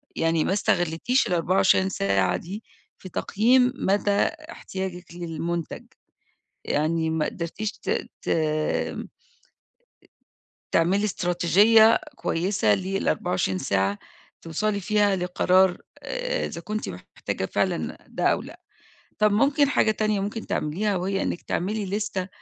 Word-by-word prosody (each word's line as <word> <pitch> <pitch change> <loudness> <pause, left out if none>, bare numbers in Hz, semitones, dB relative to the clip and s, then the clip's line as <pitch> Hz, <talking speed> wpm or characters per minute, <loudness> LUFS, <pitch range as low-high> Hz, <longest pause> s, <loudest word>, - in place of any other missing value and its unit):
يعني 165 -1 +1
ما - - 0
استغلّيتيش 175 +5 +1
ال24 185 +2 +3
ساعة 100 - +1
دي 200 +6 -8 0.3
في 185 - -10
تقييم 250 +8 +3
مدى 205 -3 +1 0.4
احتياجِك 190 - -6
للمنتج، 170 -1 -4 0.8
يعني 160 +2 0
ما 160 -1 0
قدرتيش 190 +6 -4
ت - - -6 0.3
ت - - -8
أ 155 -1 0 1.7
تعملي 190 +5 +2
إستراتيجية 205 +5 +4 0.2
كويسة 165 - +1
لل24 185 - -1
ساعة 95 +2 0 0.4
توصلي 200 +6 -1
فيها 205 +1 +2
لقرار 180 0 +3 0.3
آآ، - - -2
إذا 170 - -6
كنتِ 215 +5 -4
محتاجة - - -5
فعلًا - - -1
ده - - -5
أو - - +3
لأ. - - -12 0.6
طب 210 -1 +4
ممكن 275 +6 +3
حاجة 250 - +3
تانية 215 -1 0
ممكن 210 +3 -4
تعمليها 195 +7 -1
وهي 195 +2 -1
إنِك - - -3
تعملي 205 +4 -2
ليستة 195 -1 -2
190 Hz, 115 wpm, -25 LUFS, 165-210 Hz, 1.7 s, إستراتيجية